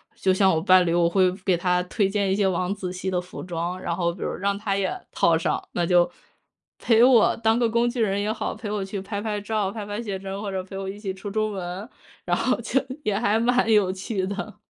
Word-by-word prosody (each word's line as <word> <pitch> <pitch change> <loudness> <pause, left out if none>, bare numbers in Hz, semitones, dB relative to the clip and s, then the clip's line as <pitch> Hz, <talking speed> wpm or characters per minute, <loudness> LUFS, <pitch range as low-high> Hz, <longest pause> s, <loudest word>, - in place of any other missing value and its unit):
就 190 - +1
像 190 0 +4
我 160 - 0
伴 185 0 +5
侣， 170 - +1
我 170 -1 +3
会 185 0 +3
给 185 -2 +2
他 180 +1 +1
推 195 +2 0
荐 200 -1 0
一 - - +2
些 200 -1 +2
王 185 0 0
子 185 -3 -5
系 185 +1 -3
的 180 -1 0
服 180 0 -8
装， 175 +1 -4
然 170 - -2
后 170 -1 0
比 170 - -12
如 - - -2
让 200 +1 -1
他 200 -1 -2
也 190 -2 -2
套 170 - +3
上， 165 - -1
那 175 - -1
就 175 0 +4 0.7
陪 230 -1 +4
我 245 -3 +5
当 225 0 +2
个 240 -1 +2
工 235 +1 +2
具 240 0 -3
人 200 -2 +1
也 210 +1 0
好， 220 - -3
陪 215 - -6
我 205 -1 -2
去 195 0 -5
拍 200 +1 -4
拍 210 -1 -2
照、 205 -2 -1
拍 210 -1 -6
拍 205 +2 -4
写 205 -4 -4
真， 195 +1 -6
或 205 -2 -4
者 190 -1 -3
陪 195 +1 -9
我 195 0 -4
一 200 +2 -7
起 195 -3 -4
出 195 +2 -7
出 215 +1 0
门， 190 +3 -6 0.4
然 - - +1
后 - - +1
就， 270 - +1 0.2
也 210 -5 0
还 220 0 +2
蛮 245 -1 +2
有 205 -4 +4
趣 190 0 -3
的。 200 +2 -5
195 Hz, 275 characters per minute, -24 LUFS, 185-215 Hz, 0.7 s, 伴